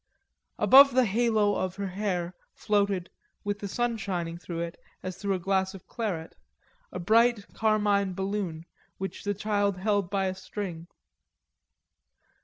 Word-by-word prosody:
Above 275 Hz, 0 st, +8 dB
the 255 Hz, -, +6 dB
yellow 200 Hz, -, -2 dB
halo 215 Hz, -2 st, +2 dB
of 185 Hz, -1 st, -2 dB
her 200 Hz, -1 st, -3 dB
hair 180 Hz, -3 st, -2 dB, 0.2 s
floated, 200 Hz, -3 st, 0 dB, 0.3 s
with 205 Hz, 0 st, -2 dB
the 200 Hz, -, -4 dB
sun 240 Hz, +3 st, 0 dB
shining 175 Hz, -5 st, -3 dB
through 170 Hz, -1 st, -6 dB
it, 170 Hz, 0 st, -4 dB, 0.3 s
as 185 Hz, -1 st, -4 dB
through 195 Hz, +1 st, -1 dB
a -, -, -1 dB
glass 190 Hz, +1 st, 0 dB
of 190 Hz, -, -12 dB
claret, 195 Hz, -9 st, -4 dB, 0.6 s
a -, -, -5 dB
bright 225 Hz, +3 st, +3 dB
carmine 205 Hz, -3 st, +2 dB
balloon 190 Hz, -4 st, -3 dB, 0.3 s
which 195 Hz, 0 st, -5 dB
the 205 Hz, 0 st, -1 dB
child 205 Hz, -1 st, 0 dB
held 200 Hz, -1 st, 0 dB
by 195 Hz, 0 st, 0 dB
a 185 Hz, -, 0 dB
string. 185 Hz, -3 st, -6 dB
200 Hz, 150 wpm, -28 LUFS, 185-210 Hz, 0.6 s, Above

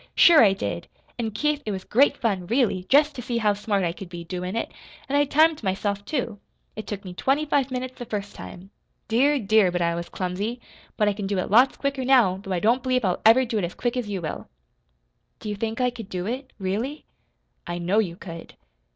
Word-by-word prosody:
"Sure 330 Hz, -5 st, +8 dB
I 200 Hz, -3 st, +5 dB
did! 195 Hz, -, -4 dB, 0.3 s
An' 225 Hz, -2 st, -1 dB
Keith, 300 Hz, +7 st, -1 dB
it -, -, -5 dB
was 190 Hz, -2 st, -4 dB
great 270 Hz, +9 st, +3 dB
fun, 195 Hz, -6 st, -1 dB
really, 220 Hz, -6 st, +1 dB
jest 295 Hz, +2 st, +5 dB
to 250 Hz, -, -6 dB
see 240 Hz, 0 st, -2 dB
how 210 Hz, -3 st, +2 dB
smart 205 Hz, -1 st, -1 dB
I 170 Hz, -, 0 dB
could 180 Hz, +1 st, -10 dB
be, 175 Hz, -1 st, -7 dB
doin' 180 Hz, +3 st, -5 dB
it. 230 Hz, -, -2 dB, 0.4 s
An' 275 Hz, -, -1 dB
I 290 Hz, 0 st, +4 dB
timed 310 Hz, +2 st, +3 dB
myself, 200 Hz, 0 st, -2 dB
too. 235 Hz, -6 st, -3 dB, 0.4 s
It 215 Hz, -, -7 dB
took 200 Hz, -1 st, -6 dB
me 180 Hz, -, -7 dB
twenty 275 Hz, +10 st, +1 dB
five 280 Hz, -3 st, +1 dB
minutes 255 Hz, 0 st, -5 dB
the 245 Hz, -, -5 dB
first 205 Hz, -2 st, -5 dB
time. 190 Hz, +3 st, -10 dB, 0.4 s
Dear, 275 Hz, +6 st, +3 dB
dear, 215 Hz, -5 st, +3 dB
but 175 Hz, -, -1 dB
I 170 Hz, -1 st, +1 dB
was 170 Hz, 0 st, -5 dB
clumsy! 200 Hz, +6 st, -3 dB, 0.4 s
But 210 Hz, -, +2 dB
I 205 Hz, -, +2 dB
can 200 Hz, -1 st, -4 dB
do 200 Hz, 0 st, -1 dB
it 185 Hz, -, -2 dB
lots 250 Hz, +5 st, +5 dB
quicker 280 Hz, -1 st, -2 dB
now, 245 Hz, -8 st, +4 dB
though 195 Hz, -, -8 dB
I 180 Hz, -, +1 dB
don't 235 Hz, +7 st, +2 dB
believe 255 Hz, -2 st, 0 dB
I'll 180 Hz, -, 0 dB
ever 255 Hz, +4 st, +6 dB
do 225 Hz, -2 st, -1 dB
it -, -, -2 dB
as 175 Hz, -, -4 dB
quick 240 Hz, 0 st, -2 dB
as 245 Hz, -4 st, -3 dB
you 190 Hz, -4 st, -4 dB
will." 155 Hz, -, -5 dB, 0.9 s
"Do 215 Hz, -, -6 dB
you 210 Hz, -, -2 dB
think 225 Hz, +3 st, -3 dB
I 250 Hz, -1 st, +2 dB
could 225 Hz, -4 st, -9 dB
do 180 Hz, -1 st, -4 dB
it, 255 Hz, +5 st, -4 dB
really?" 220 Hz, +10 st, -3 dB, 0.6 s
"I 175 Hz, 0 st, -3 dB
know 180 Hz, +5 st, +1 dB
you 180 Hz, -6 st, -1 dB
could." 165 Hz, -2 st, -10 dB
215 Hz, 230 wpm, -24 LUFS, 190-255 Hz, 0.9 s, Sure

